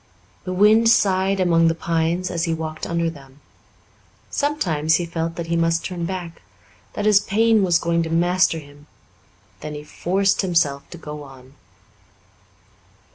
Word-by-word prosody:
The 185 - -4
wind 215 +4 +5
sighed 195 -3 +2
among 165 -2 +3
the 165 - +1
pines 165 +2 -1
as 170 +1 -1
he 165 -1 -1
walked 160 -1 -5
under 170 0 -1
them. 140 -4 -10 0.9
Sometimes 165 - 0
he 175 - -1
felt 165 0 -4
that 170 - -4
he 170 0 -2
must 165 0 +1
turn 175 -2 -4
back 175 -2 -6 0.5
that 205 - -3
his 210 -2 +6
pain 220 +2 +2
was 175 -3 +3
going 170 0 0
to 165 - -3
master 175 +1 +2
him; 145 -1 -13 0.7
then 150 +5 -7
he 150 - -7
forced 195 +6 0
himself 165 -7 0
to 175 - -10
go 150 -2 -8
on. 135 -2 -14
170 Hz, 155 wpm, -21 LUFS, 160-185 Hz, 0.9 s, his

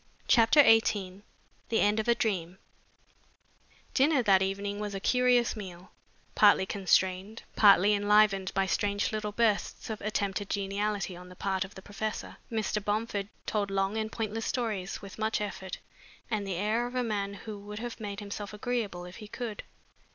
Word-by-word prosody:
CHAPTER 235 +5 +6
XVIII 205 -5 +3 0.5
THE 225 - +2
END 210 +1 +3
OF 220 - -2
A 235 - +4
DREAM 185 -6 -2 1.4
Dinner 275 -1 +3
that 195 -3 +5
evening 200 +1 -2
was 210 -1 -4
a - - -3
curious 250 +2 +3
meal, 185 -4 -9 0.4
partly 205 -2 +5
constrained, 190 +1 0
partly 205 -1 +6
enlivened 205 -2 +3
by 195 0 +2
strange 200 +1 0
little 215 -1 -3
bursts 220 0 0
of 215 - -5
attempted 200 -1 -2
geniality 200 -1 -2
on 180 +1 -11
the 180 - -12
part 190 0 -1
of 190 +2 -11
the 190 - -10
professor. 215 +2 -5
Mr. 215 -2 -1
Bomford 210 -1 -1 0.2
told 205 -2 -1
long 195 +1 0
and 220 0 -2
pointless 225 0 -3
stories 215 -8 -3
with 200 +1 -10
much 220 0 0
effort 190 -2 -5 0.5
and 205 -2 -1
the 190 - -2
air 215 +6 0
of 245 - -9
a 250 - +1
man 200 -3 -2
who 210 +1 -8
would 205 +1 -8
have 240 +2 -6
made 205 -1 -5
himself 205 0 -6
agreeable 210 -5 -3
if 180 - -10
he 215 - -9
could. 225 -1 -5
205 Hz, 165 wpm, -29 LUFS, 195-220 Hz, 1.4 s, CHAPTER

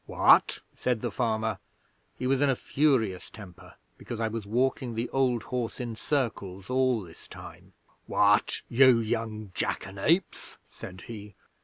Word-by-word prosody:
"What?" - - +4
said 125 -3 -1
the 120 - -2
farmer 110 -3 -1 0.6
he 125 - -4
was 135 +1 +2
in 145 - +4
a 135 - +2
furious 120 -11 0
temper 95 -5 -13 0.2
because 115 - -7
I 115 -1 0
was 110 -2 -5
walking 125 +1 0
the 115 +2 -3
old 125 -4 +1
horse 125 -3 -4
in 120 -2 -4
circles 110 -7 -3
all 130 -3 +2
this 85 -2 -14
time - - -12 0.3
"What, 105 0 +2
you 130 0 +6
young 110 -2 -3
jackanapes?" 100 - -1
said 90 0 -10
he. 105 -2 -10
115 Hz, 145 wpm, -28 LUFS, 105-125 Hz, 0.6 s, you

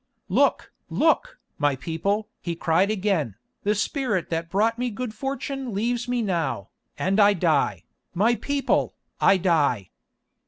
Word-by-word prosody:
"Look! - - +2 0.2
look! - - +2 0.2
my 145 -2 +2
people!" 195 +9 -2
he 170 -1 -3
cried 170 +4 +2
again, 190 - 0 0.3
"the 210 +1 +1
spirit 210 - -1
that 165 0 -2
brought 220 +5 +1
me 250 0 0
good 235 +1 -5
fortune 270 -1 -4
leaves 240 +3 -1
me 245 -1 0
now, 165 - -1 0.3
and 195 +3 +1
I 205 0 +7
die, 165 -6 +1 0.3
my 215 +7 +4
people, 280 +3 0 0.2
I 195 - +5
die!" 150 - +1
200 Hz, 140 wpm, -25 LUFS, 165-235 Hz, 0.3 s, I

